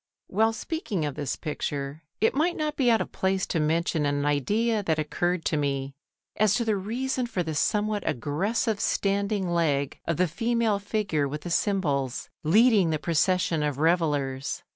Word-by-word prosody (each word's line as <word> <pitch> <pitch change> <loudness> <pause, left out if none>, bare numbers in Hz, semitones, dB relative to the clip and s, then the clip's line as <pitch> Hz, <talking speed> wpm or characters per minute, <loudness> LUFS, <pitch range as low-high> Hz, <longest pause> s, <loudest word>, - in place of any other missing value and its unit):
While 220 +3 +2
speaking 225 - -3
of 145 - -2
this 145 -2 -3
picture, 145 -1 -4 0.2
it 220 - +3
might 330 +5 +1
not 305 -1 -1
be 260 -4 +2
out 225 -1 +4
of - - -4
place 190 0 0
to 165 - -1
mention 160 +1 +1
an 145 0 0
idea 210 - +1
that 160 -5 0
occurred 175 +3 -1
to 155 - +1
me 140 -1 -1 0.4
as 210 -1 +3
to 235 - 0
the 220 -2 +2
reason 245 +6 -2
for 185 -6 -2
the 160 -1 -4
somewhat 210 +6 +1
aggressive 200 - -1
standing 200 -1 0
leg 150 -5 0
of 165 - -1
the 180 - +3
female 225 +4 0
figure 200 -8 -1
with 150 +2 -5
the 175 - -6
cymbals 145 - 0
leading 205 +2 +5
the 155 - +1
procession 170 +1 +1
of 145 -2 -1
revellers. 145 -5 0
175 Hz, 170 wpm, -26 LUFS, 150-215 Hz, 0.4 s, leading